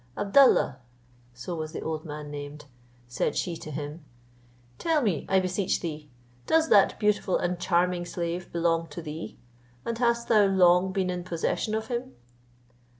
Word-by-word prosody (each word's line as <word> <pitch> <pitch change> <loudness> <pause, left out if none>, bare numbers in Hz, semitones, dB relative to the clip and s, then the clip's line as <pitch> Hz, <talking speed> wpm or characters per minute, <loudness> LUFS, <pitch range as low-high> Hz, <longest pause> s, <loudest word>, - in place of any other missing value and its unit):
"Abdallah," 205 - +4 0.5
(so 125 +8 -7
was 155 -1 -5
the - - -5
old 160 0 -4
man 150 -1 -7
named) 145 0 -7 0.4
said 120 - -1
she 175 - -1
to 155 - -9
him, 150 +2 -6 0.8
"tell 325 -2 +2
me, 190 -10 -1
I 190 - +4
beseech 185 +1 0
thee, 155 -3 -6 0.4
does 320 0 +3
that 200 -2 +5
beautiful 210 -2 +1
and 175 0 -2
charming 175 0 +1
slave 175 0 -4
belong 165 -1 +1
to 155 +2 -8
thee? 155 +1 -7 0.5
and 230 0 -3
hast 235 -1 +1
thou 215 -3 +5
long 185 -1 +4
been 185 -1 -1
in 180 -1 -4
possession 175 +5 -2
of 220 0 -2
him?" 245 +2 -4
175 Hz, 155 wpm, -27 LUFS, 155-205 Hz, 0.8 s, that